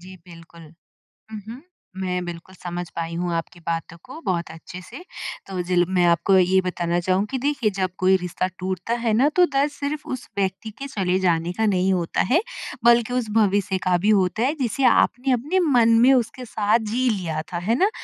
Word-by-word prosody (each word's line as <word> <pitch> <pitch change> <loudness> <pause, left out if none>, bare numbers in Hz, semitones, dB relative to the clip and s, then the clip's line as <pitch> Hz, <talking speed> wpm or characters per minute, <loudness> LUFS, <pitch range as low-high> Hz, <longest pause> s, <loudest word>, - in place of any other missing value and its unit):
जी, 185 +1 -12
बिल्कुल। 165 -2 -14 0.6
हुँ, 215 - -5
हुँ। 250 +4 -8 0.4
मैं 180 -1 -2
बिल्कुल 175 +2 -9
समझ 175 0 -5
पाई 165 0 -3
हूँ 175 0 -2
आपकी 165 +1 -5
बातों 165 0 -4
को 265 +6 -10
बहुत 170 -2 -1
अच्छे 170 +3 -10
से 350 - -11 0.4
तो 185 -2 -3
जील 175 0 +2
मैं 175 -1 +4
आपको 190 +3 +3
ये 185 +1 +4
बताना 175 -1 -1
चाहूँगी 190 +8 0
देखिए 275 -4 0
जब 185 -1 0
कोई 185 +1 +4
रिश्ता 180 +1 -3
टूटता 185 +4 -3
है 230 - +2
ना 250 +6 +4
तो 360 -1 +6
दर्द 285 -1 0
सिर्फ 290 +1 -4
उस 245 - -12
व्यक्ति 195 +3 -2
के 275 - -5
चले 185 -7 0
जाने 170 -2 +1
का 220 - +2
नहीं 190 -2 +2
होता 170 -2 0
है 335 +7 +5 0.4
बल्कि 235 0 +4
उस 245 -4 -1
भविष्य 200 -2 +2
का 180 -1 +2
भी - - +4
होता 200 +2 +2
है 275 - +2
जिसे 260 +3 -1
आपने 255 +1 +3
अपने 295 +10 0
मन 240 -5 +4
में 260 +3 +6
उसके 250 0 -1
साथ 215 +1 +1
जी 250 +3 0
लिया 170 -7 -2
था। 170 - -1
है 215 +7 0
ना? 390 - +4
190 Hz, 200 wpm, -23 LUFS, 175-240 Hz, 0.6 s, तो